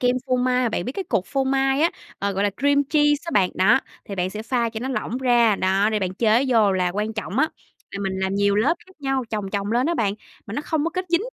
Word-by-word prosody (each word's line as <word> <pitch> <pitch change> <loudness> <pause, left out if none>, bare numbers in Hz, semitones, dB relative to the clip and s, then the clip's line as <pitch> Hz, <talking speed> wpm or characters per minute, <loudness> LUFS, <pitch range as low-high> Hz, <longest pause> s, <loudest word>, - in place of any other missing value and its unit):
kem 250 0 +2
phô 255 - +1
mai. 250 0 +1
Mà - - +2
bạn 195 -5 -2
biết 250 - -4
cái 385 +4 -4
cục 220 - -1
phô 270 -1 -1
mai 270 +1 +1
á, 335 - +4 0.3
ờ, 200 0 -1
gọi 195 +1 0
là, 205 - +2
cream 285 +1 +2
cheese 295 0 +2
á 335 - -4
bạn, 185 -3 +3
đó, 220 +8 +4 0.2
thì 200 - -6
bạn 185 0 -1
sẽ 215 +2 -6
pha 235 0 0
cho 225 0 -6
nó 260 - -3
lỏng 250 -1 -3
ra, 240 -5 +3
đó, 195 +3 +2
để 215 - +1
bạn 185 -2 -3
chế 225 +5 +3
vô. 220 -5 +4
Là 185 -1 +1
quan 210 +3 -2
trọng 215 0 -4
á 310 - +3 0.4
là 200 - -6
mình 195 -1 -1
làm 190 0 -1
nhiều 200 0 +2
lớp 270 +11 +3
khác 375 - -18
nhau, 270 -2 -1
chồng 205 -3 -3
chồng 200 +1 -2
lên 250 +4 +2
á 340 - +1
bạn, 205 -6 0 0.3
mà 210 - -6
nó 290 - -2
không 305 -1 -1
có 335 - 0
kết 370 0 -3
dính, 340 0 +2
235 Hz, 285 wpm, -23 LUFS, 200-270 Hz, 0.4 s, á